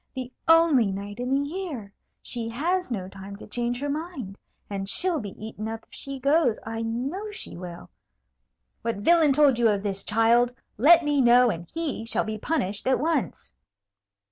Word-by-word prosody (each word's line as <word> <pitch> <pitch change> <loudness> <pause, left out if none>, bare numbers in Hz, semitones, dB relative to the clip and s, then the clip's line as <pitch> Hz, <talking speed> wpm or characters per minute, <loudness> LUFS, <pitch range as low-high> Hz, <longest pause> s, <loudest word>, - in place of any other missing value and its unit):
The 255 -1 -5
only 325 -8 +5
night 200 +2 -5
in 250 +1 -2
the 280 +1 +1
year! 295 - -6 0.3
She 230 -2 -4
has 345 +9 -1
no 195 -7 -3
time 195 +1 -9
to 200 - -11
change 240 +2 -2
her 290 - -1
mind; 290 - -4 0.3
and 195 -1 -4
she'll 355 - 0
be 205 -6 -7
eaten 215 0 -6
up 225 0 -5
if - - -46
she 275 0 -6
goes, 275 -3 +3
I 225 0 -4
know 265 - -3
she 420 - -7
will. 175 -1 -8 0.9
What 230 0 -1
villain 310 +8 +4
told 275 -3 +4
you 230 -1 +5
of 205 -1 0
this, 195 -1 -3
child? 235 +3 +3 0.2
Let 330 +6 +7
me 290 -2 +2
know, 245 0 +6
and 170 -1 -7
he 320 -8 -3
shall - - 0
be 215 0 -4
punished 210 - -2
at 260 - +3
once." 295 - -1
240 Hz, 180 wpm, -26 LUFS, 210-295 Hz, 0.9 s, Let